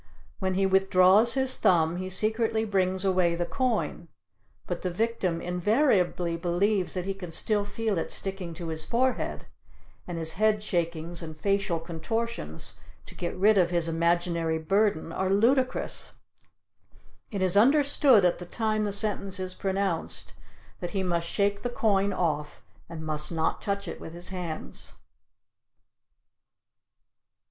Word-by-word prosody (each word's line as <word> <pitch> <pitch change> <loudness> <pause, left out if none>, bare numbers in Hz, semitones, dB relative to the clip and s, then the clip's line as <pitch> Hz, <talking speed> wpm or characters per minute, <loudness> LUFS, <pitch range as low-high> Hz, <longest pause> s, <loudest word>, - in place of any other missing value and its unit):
When 190 -1 -1
he 195 +1 +2
withdraws 190 +4 +4
his 265 -1 +1
thumb 165 -1 +3
he 185 +1 -4
secretly 220 +3 0
brings 190 -2 0
away 180 -3 +2
the 175 0 -1
coin, 250 +2 -1 0.6
but - - -4
the 185 - -1
victim 185 -3 -1
invariably 180 - +1
believes 180 +3 0
that 180 -1 -2
he 195 - -1
can 185 -3 -8
still 205 +5 0
feel 205 -2 -2
it - - -3
sticking 190 -4 -5
to 170 -1 -6
his 160 -1 -3
forehead, 255 +7 -1 0.6
and 175 -2 -4
his 160 -1 -2
head 215 0 +2
shakings 170 -3 -2
and 160 -2 -8
facial 195 -1 0
contortions 225 +8 -4 0.3
to - - -12
get 175 0 -4
rid 205 +2 +5
of 175 -2 +3
his 170 -2 0
imaginary 170 0 +1
burden 195 0 +1
are 190 +2 -1
ludicrous. 255 +6 +1 1.2
It 200 -3 -2
is 185 0 +2
understood 270 -2 +5
at 175 - +2
the 180 - -7
time 215 +1 0
the 205 - -1
sentence 200 -2 0
is 185 0 -3
pronounced 195 -2 -2 0.5
that 175 +3 -4
he 190 - +1
must 170 -2 -1
shake 200 +1 0
the 245 - -2
coin 200 -4 +1
off 150 -5 -2 0.3
and 160 -2 -7
must 150 0 -2
not 160 -1 -1
touch 200 -1 -2
it - - -6
with 160 - -8
his 175 +2 -3
hands. 180 -4 -6
190 Hz, 145 wpm, -27 LUFS, 170-210 Hz, 1.2 s, rid